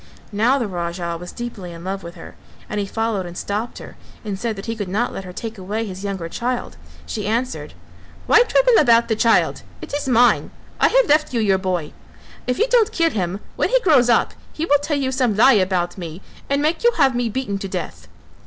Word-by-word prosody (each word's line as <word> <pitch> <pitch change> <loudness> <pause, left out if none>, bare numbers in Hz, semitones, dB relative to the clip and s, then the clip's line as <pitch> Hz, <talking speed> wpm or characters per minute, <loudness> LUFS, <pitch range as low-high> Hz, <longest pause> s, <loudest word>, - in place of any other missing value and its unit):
Now 225 +6 +3
the 250 - -1
Raja 170 -2 -3
was 180 +1 -8
deeply 215 -7 -7
in 170 0 -10
love 195 +1 -4
with 170 -1 -9
her - - -11 0.3
and 210 - -3
he 200 - -2
followed 220 -3 -2
and 175 +1 -9
stopped 210 +4 -3
her, - - -11 0.3
and 200 -2 -4
said 230 -1 -2
that 195 - -8
he 230 - -3
could 205 -4 -4
not 220 +6 -1
let 195 - -6
her 180 - -8
take 225 +3 -7
away 210 +4 -3
his 190 -1 -7
younger 195 -4 -3
child; 245 +7 -3 0.3
she 210 -2 -4
answered, 235 +4 -2 0.5
"Why 445 - +6
trouble - - +4
about 235 -4 +4
the 220 - +2
child? 230 +1 +2 0.2
it - - -9
is 290 -1 -2
mine; 245 -1 +4 0.3
I - - +5
have - - +4
left 305 -3 +2
you - - +2
your 195 -3 +2
boy, 180 -5 -2 0.5
if 250 - 0
you 450 - +3
don't 465 -3 +3
kill 330 -6 +2
him, 190 0 -2
when - - 0
he - - +4
grows 275 - +4
up, 235 - +3 0.2
he 320 - -3
will 290 -3 +4
tell 290 +1 -1
you 265 -2 -1
some 250 -5 +1
lie 265 +5 +7
about 185 -3 0
me 170 +1 -7 0.3
and 280 +1 +1
make 315 +7 0
you 475 0 +5
have 265 -2 +4
me 240 -1 0
beaten 215 -4 -3
to 195 - -4
death." 185 -2 -6
225 Hz, 225 wpm, -21 LUFS, 190-260 Hz, 0.5 s, lie